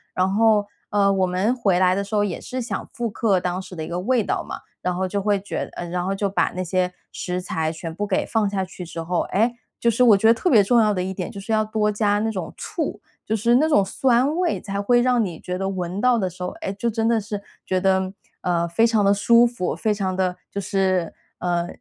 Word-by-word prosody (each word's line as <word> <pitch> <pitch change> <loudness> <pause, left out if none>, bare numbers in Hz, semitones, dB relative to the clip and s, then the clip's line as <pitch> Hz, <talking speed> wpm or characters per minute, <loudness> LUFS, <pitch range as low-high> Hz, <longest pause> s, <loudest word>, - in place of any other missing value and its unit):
然 185 0 +2
后， 215 -1 +4 0.2
呃， 200 -1 +3
我 190 -1 +2
们 185 +6 +1
回 200 -7 +2
来 185 0 +4
的 200 +2 -1
时 200 +2 -5
候 205 - +3
也 195 -4 -3
是 255 +1 -5
想 245 0 -4
复 240 -1 -3
刻 205 -3 +1
当 180 +1 -2
时 185 - -10
的 160 - -4
一 - - -6
个 175 +1 -3
味 235 +4 +1
道 - - -1
嘛。 - - -7 0.2
然 180 0 -1
后 190 +1 -1
就 200 +2 -2
会 205 0 +2
觉 200 - -4
呃， 175 - -5
然 180 +1 -2
后 195 +1 -1
就 200 0 -1
把 195 - +1
那 185 - -2
些 180 +1 0 0.2
食 180 0 -3
材 160 -3 -2
全 160 +1 -6
部 205 +5 -3
给 195 - 0
放 220 -3 +1
下 195 -1 -1
去 180 -1 -8
之 165 0 -6
后， 175 +1 -1
诶， 225 +5 +3 0.2
就 235 - +2
是 230 - -1
我 225 -4 +8
觉 195 - -2
得 225 - +8
特 235 +10 -1
别 220 -9 +6
重 235 +5 +4
要 215 -2 +3
的 180 -2 -1
一 190 +1 -3
点 180 -2 -4
就 200 - -8
是 200 +3 -6
要 215 0 +2
多 215 0 0
加 205 -1 +1
那 220 +1 0
种 185 -6 -5
醋， 300 -10 -4 0.3
就 220 - 0
是 235 +3 +3
那 300 +5 +4
种 290 -10 +4
酸 255 - +2
味 360 -2 0
才 200 -1 -3
会 240 +4 +3
让 245 -2 +3
你 175 -5 -4
觉 180 0 -4
得 195 +1 -2
闻 185 -1 -3
到 250 +1 +3
的 190 -4 0
时 180 +1 -14
候， 180 - -1
哎， - - -2
就 205 +4 -2
真 225 0 -1
的 230 -1 +3
是 205 -1 -5 0.2
觉 185 - 0
得， 190 0 +1 0.3
呃， 170 -1 +1
非 225 +7 +3
常 220 -3 +2
的 200 0 +5
舒 235 +4 +5
服， 235 -7 -2
非 215 - 0
常 190 -2 -2
的 185 -1 0
就 200 - -4
是， 185 -3 0 0.3
呃， 175 -1 0
200 Hz, 280 characters per minute, -23 LUFS, 185-225 Hz, 0.3 s, 我